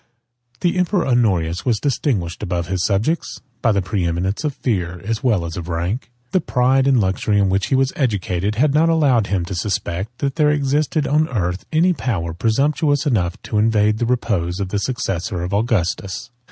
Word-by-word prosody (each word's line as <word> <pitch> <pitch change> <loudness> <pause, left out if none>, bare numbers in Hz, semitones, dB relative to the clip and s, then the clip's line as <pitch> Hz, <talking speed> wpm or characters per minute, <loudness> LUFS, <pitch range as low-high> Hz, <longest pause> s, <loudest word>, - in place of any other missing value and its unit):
The 180 0 +1
emperor 180 0 +1
Honorius 95 -10 +1
was 115 -4 +1
distinguished, 115 - -1
above 90 -4 -2
his 95 -1 -1
subjects, 110 +12 0 0.2
by 115 - +3
the 100 -2 +1
preeminence 90 - -1
of 150 -3 -2
fear, 90 -7 -2
as 115 +2 -2
well 105 -9 +2
as 80 +1 -6
of 90 0 -6
rank. 90 +10 -2 0.2
The 185 - +2
pride 130 0 +2
and 135 -3 +4
luxury 100 +1 +1
in 100 -1 +3
which 95 +1 +1
he 135 - +1
was 135 0 +2
educated, 100 - -1
had 140 +5 +2
not 160 +3 +4
allowed 140 -10 +3
him 95 -4 -1
to 90 - -5
suspect, 95 +4 -3
that 140 -1 -2
there 150 -1 +4
existed 150 +1 +1
on 150 +2 +2
the 125 -7 -4
earth 90 0 -2
any 170 +3 +3
power 90 - -2
presumptuous 140 - +1
enough 95 - 0
to 105 - -1
invade 105 -1 +2
the 120 - 0
repose 95 -8 -1
of 95 -2 -2
the 105 - -1
successor 95 -5 -2
of 90 +3 -4
Augustus. 105 +1 -1
110 Hz, 190 wpm, -20 LUFS, 90-135 Hz, 0.2 s, and